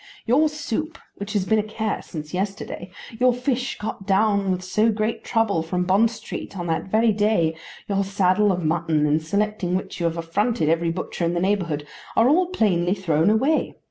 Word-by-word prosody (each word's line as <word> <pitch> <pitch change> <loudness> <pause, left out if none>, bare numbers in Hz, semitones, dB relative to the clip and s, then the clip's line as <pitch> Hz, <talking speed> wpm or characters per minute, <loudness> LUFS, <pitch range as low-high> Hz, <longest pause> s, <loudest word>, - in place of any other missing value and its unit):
Your 295 +7 +4
soup, 300 +1 -4 0.2
which 200 +1 -5
has 200 -3 +1
been 220 +2 +3
a - - 0
care 215 0 -3
since 155 -2 -8
yesterday, 195 -1 -4 0.3
your 255 0 +5
fish, 250 0 -2
got 210 -2 -6
down 200 0 +2
with 185 0 -1
so 215 +5 +2
great 215 +1 -2
trouble 225 -7 +1
from 180 +2 -1
Bond 195 +5 +3
Street 220 -3 -7
on 175 - -4
that 165 -1 -1
very 220 +3 +3
day, 205 -6 +1 0.3
your 200 -1 +1
saddle 195 +1 +2
of 180 -3 -2
mutton, 160 -1 +1
in 150 +1 +2
selecting 200 +2 -1
which 185 - -4
you 170 - +1
have 165 0 -3
affronted 170 +2 0
every 165 +1 +2
butcher 175 +1 -4
in 170 +1 +1
the - - +1
neighbourhood, 175 -6 0 0.3
are 225 - +5
all 345 +6 +4
plainly 190 - +1
thrown 165 -3 +2
away! 265 +9 +1
200 Hz, 190 wpm, -23 LUFS, 175-220 Hz, 0.3 s, your